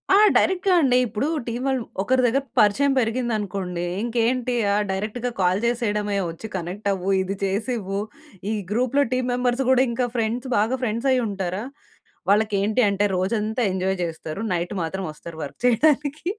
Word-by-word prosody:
ఆ! - - +7 0.2
డైరెక్ట్‌గా 375 0 +3
అండి, 255 -3 +4
ఇప్పుడు 225 +4 -2 0.2
టీమ్ 240 +2 -3
వాళ్ళు 265 -2 +1 0.2
ఒకరి 255 +5 +2
దగ్గర 260 +3 +2 0.2
పరిచయం 235 +7 +4
పెరిగిందనుకోండి. 210 -7 -2 0.2
ఇంకేంటి 245 +1 0 0.2
ఆ! - - +2 0.2
డైరెక్ట్‌గా 220 +6 -3
కాల్ 180 +1 +3
చేసేయడమే 210 -4 0
వచ్చి 165 +7 -7
కనెక్ట్ 185 +4 -4
అవ్వు 190 0 -3
ఇది 195 +1 -3
చేసివ్వు. 200 -1 -2 0.5
ఈ - - 0 0.2
గ్రూప్‌లో 255 +5 +2
టీమ్ 255 0 0
మెంబర్స్ 245 +1 +1
కూడా 260 0 +5
ఇంకా 245 +1 0
ఫ్రెండ్స్ 235 +3 -1
బాగా 225 +5 +1
ఫ్రెండ్స్ 235 +3 0
అయ్యుంటారా! 200 -5 -1 0.7
వాళ్ళకేంటి 210 +2 +2
అంటే 200 +1 +1
రోజంతా 215 +5 -1
ఎంజాయ్ 190 +1 0
చేస్తారు. 160 +2 -6
నైట్ 175 +2 -2
మాత్రం 190 +4 -3
వస్తారు 160 +1 -10
వర్క్ 140 - -8
చేయడానికి. 290 +4 +2
220 Hz, 145 wpm, -23 LUFS, 195-250 Hz, 0.7 s, ఆ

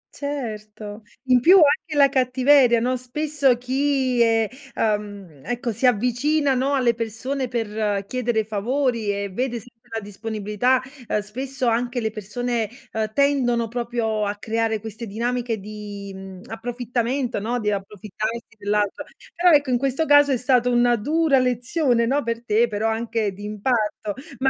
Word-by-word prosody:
Certo, 215 -7 -6 0.2
in 255 -2 +4
più 345 +10 +7
anche 320 -1 +4
la 280 -1 +7
cattiveria, 255 -1 +4
no, 250 +2 0
spesso 275 +1 +1
chi 260 0 0
è 225 -1 +3 0.3
ehm, 205 -8 -2
ecco, 245 0 -2
si 230 +4 +1
avvicina, 250 +6 +2
no, 265 +2 +1
alle 250 -3 +3
persone 235 +4 -3
per 215 -4 -2
chiedere 240 -1 -1
favori 230 +2 -1
e 200 0 -3
vede 245 +4 -2
sempre 230 0 -20
la 225 - -2
disponibilità, 210 +4 -1 0.3
ehm, 210 - +1
spesso 255 +5 -4
anche 240 +2 0
le 220 -2 -1
persone, 220 +2 -3 0.2
ehm, 220 -1 -2
tendono 250 -4 +2
proprio 230 -3 -1
a 205 - -2
creare 220 +1 -1
queste 220 +2 -7
dinamiche 235 +2 -2
di, 205 -1 -8
mhmm, 190 -1 -10
approfittamento, 245 +2 -2
no, 235 +4 -2
di 210 -2 0
approfittarsi 210 +3 -5
dell'altro. 205 0 -1 0.3
Però 355 +1 +4
ecco, 290 -5 +4
in 245 - +2
questo 275 +4 0
caso 290 -1 +6
è 260 - +2
stata 250 0 +2
una 240 0 +4
dura 295 +4 +2
lezione, 250 0 +1
no, 275 +5 +1
per 230 -1 -4
te, 225 +1 +3
però 215 0 -1
anche 225 -1 -1
di 205 +2 -9
impatto. 210 0 -1 0.2
Ma 265 +2 +2
235 Hz, 150 wpm, -23 LUFS, 215-255 Hz, 0.3 s, più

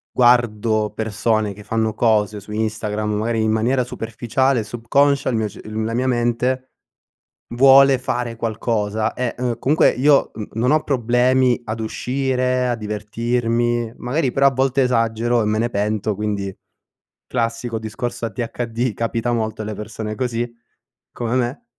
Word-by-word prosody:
guardo 115 -3 +3
persone 110 -1 0
che 105 +2 -12
fanno 110 0 -1
cose 105 -2 +1
su 105 +1 -12
Instagram, 105 0 -2
magari 110 +1 0
in 110 - +2
maniera 120 +4 +1
superficiale, 120 +2 -1
subconscia, 140 +6 +1
il 120 - 0
mio 110 -1 0
cer 100 - -11
uhm, 110 +1 -3
la 115 - -2
mia 125 +2 0
mente 125 +1 0 0.8
vuole 135 +2 +7
fare 120 -2 -2
qualcosa. 110 -1 -1
E, 125 -2 -2
uhm, 120 -2 -2
comunque 150 +4 +4
io 140 +2 +3
n 105 -2 -6
non 120 +4 +1
ho 155 0 +3
problemi 125 0 +2
ad 110 +1 -4
uscire, 125 +2 -1
a 120 - 0
divertirmi, 115 +2 -1
magari 130 +1 -1
però 140 0 +4
a - - +4
volte 135 +1 +1
esagero 115 -1 +1
e - - -1
me 105 +1 0
ne 120 +1 +1
pento, 105 0 -1
quindi 100 -2 -3 0.7
classico 115 -1 -2
discorso 115 +2 -4
ADHD, 115 0 -3
capita 115 +2 -1
molto 110 -1 -2
alle 110 0 -4
persone 105 +1 -5
così, 120 -1 -1 0.6
come 120 +1 -2
me 125 +2 -1
115 Hz, 150 wpm, -20 LUFS, 110-125 Hz, 0.8 s, vuole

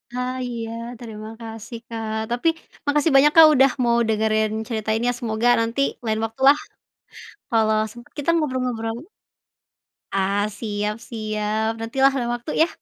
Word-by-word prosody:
Ah, 250 +1 -2
iya, 230 -2 -5 0.3
terima 215 -2 -8
kasih 225 +1 -8
Kak 220 -1 -4
tapi, 245 +7 0 0.4
makasih 295 +2 +2
banyak 295 +2 +7
Kak 320 -1 +10
udah 265 -1 +5
mau 235 0 +3
dengerin 215 0 +1 0.2
cerita 220 -2 -3
ini 235 +2 -1
ya, - - +1
semoga 230 0 0
nanti 230 +4 0 0.2
lain 220 0 0
waktu 225 +4 -9
lah, 290 +2 +7 0.9
kalau 220 -1 +3
sempat 240 +1 -14
kita 290 +3 -2
ngobrol-ngobrol. 250 -6 -1 1.2
Ah, 195 +1 +1 0.2
siap 210 -1 -2
siap, 215 -1 -2
nanti 225 +4 -6
lah 275 - +7
lain 240 -2 -1
waktu 240 +5 -6
ya. 330 - +5
225 Hz, 150 wpm, -22 LUFS, 220-250 Hz, 1.2 s, Kak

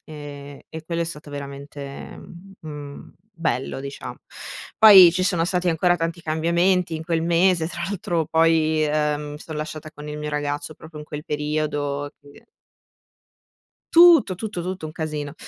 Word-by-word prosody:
Ehm, 145 -2 -9
e 160 0 -8
quello 170 0 -2
è - - -1
stato 150 -3 -8
veramente, 140 0 -8
mhmm, 195 +3 -14
mhmm, 145 -2 -9 0.2
bello 155 -7 -2
dicia 140 +1 -7 0.6
Poi 190 -6 +10
ci 185 - 0
sono 180 -3 +1
stati 180 0 0
ancora 175 +2 +3
tanti 165 0 -3
cambiamenti 170 +2 +1
in 160 - -7
quel 165 -1 0
mese, 170 0 +2
tra 170 -1 -6
l'altro 175 -5 -2
poi, 160 -1 +3
ehm, 150 -1 -1
mi 150 - -8
son 155 0 -8
lasciata 155 0 -6
con 150 0 -10
il 150 0 -5
mio 150 0 -4
ragazzo 145 +1 -3
proprio 160 -1 -12
in 150 - -8
quel 150 0 -7
periodo, 150 -2 -2
e - - -9
quindi 145 +10 -18 1.5
Tutto, 335 - +7
tutto, 205 -2 -5
tutto, 185 -1 -5
un 155 - -6
casino. 150 -2 -4
155 Hz, 165 wpm, -23 LUFS, 150-170 Hz, 1.5 s, Poi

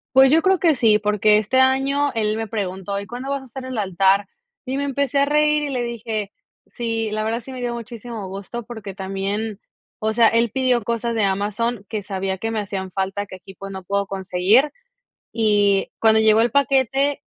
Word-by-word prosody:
Pues, 265 0 +7
yo 325 +1 +5
creo 380 -2 +3
que 330 -4 +3
sí, 220 -4 +4
porque 210 0 +3
este 215 +5 +1
año 275 +2 +2
él 215 -1 0
me 225 - -3
preguntó: 200 -1 -3
"¿Y 200 - -6
cuándo 250 +3 -6
vas 280 -1 -2
a - - -12
hacer 260 +1 -8
el 260 -3 -5
altar?". 195 0 +2 0.4
Y 265 +2 -2
me 280 - -1
empecé 280 0 0
a 280 - +4
reír 300 +1 +2
y 290 - -2
le 250 -3 -2
dije, 225 -3 -4 0.3
sí, 225 -2 -3
la 215 0 -1
verdad 225 +2 -1
sí 260 +3 -10
me 255 - -6
dio 240 -1 -2
muchísimo 230 -3 -7
gusto, 200 +5 -6
porque 220 -5 -8
también, 195 +3 -3 0.4
o 220 0 0
sea, 225 0 +5
él 230 0 +2
pidió 255 -3 +1
cosas 235 +1 -2
de 220 - +1
Amazon 205 +3 -1
que 215 -2 -4
sabía 190 -1 -3
que 225 +3 -3
me 220 - -1
hacían 190 -2 -4
falta, 195 +2 -2
que 190 - -10
aquí, 190 +1 -14
pues, 195 +1 -8
no 190 -1 -7
puedo 200 +1 -1
conseguir 195 +8 +2 0.6
y 205 -3 +2
cuando 220 -1 +4
llegó 220 0 +5
el 235 - +2
paquete 275 0 +2
225 Hz, 205 wpm, -21 LUFS, 200-255 Hz, 0.6 s, Pues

